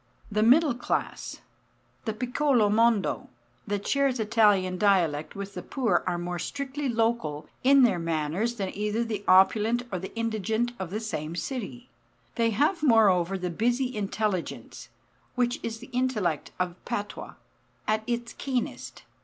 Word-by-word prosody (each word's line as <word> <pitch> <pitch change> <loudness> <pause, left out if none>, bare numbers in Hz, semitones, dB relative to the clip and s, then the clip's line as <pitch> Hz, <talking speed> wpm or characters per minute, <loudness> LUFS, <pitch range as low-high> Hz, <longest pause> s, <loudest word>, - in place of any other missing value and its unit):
The 210 +1 +1
middle 270 +6 +5
class 245 - -3 0.6
the 220 - -1
piccolo 250 -1 +2
mondo 225 -1 +2 0.4
hat 205 -1 -2
shares 275 -3 +1
Italian 210 -4 +3
dialect 175 -8 +2
with 200 0 -6
the - - -5
poor 260 -4 0
are 180 -1 0
more 175 0 -4
strictly 280 - -3
local 225 -11 0 0.2
in 275 +1 +6
their 205 -8 +3
manners 165 +8 -1
than 195 -4 -4
either 210 +3 -1
the 215 -3 -4
opulent 215 +5 +4
or 185 - -2
the 190 - -7
indigent 225 +1 -1
of 190 -3 -4
the 210 +4 -3
same 165 -8 -4
city. 200 - -5 0.5
They 230 -1 +2
have 295 - +1
moreover 195 - +4
the 180 -1 -3
busy 245 +7 0
intelligence 205 -3 -3 0.5
(which 245 -1 0
is 225 -1 -4
the 245 - -12
intellect 220 - 0
of 180 -1 -3
patois) 205 -4 -5 0.5
at 215 0 +2
its 240 -1 -2
keenest. 255 -3 -4
220 Hz, 145 wpm, -27 LUFS, 190-240 Hz, 0.6 s, in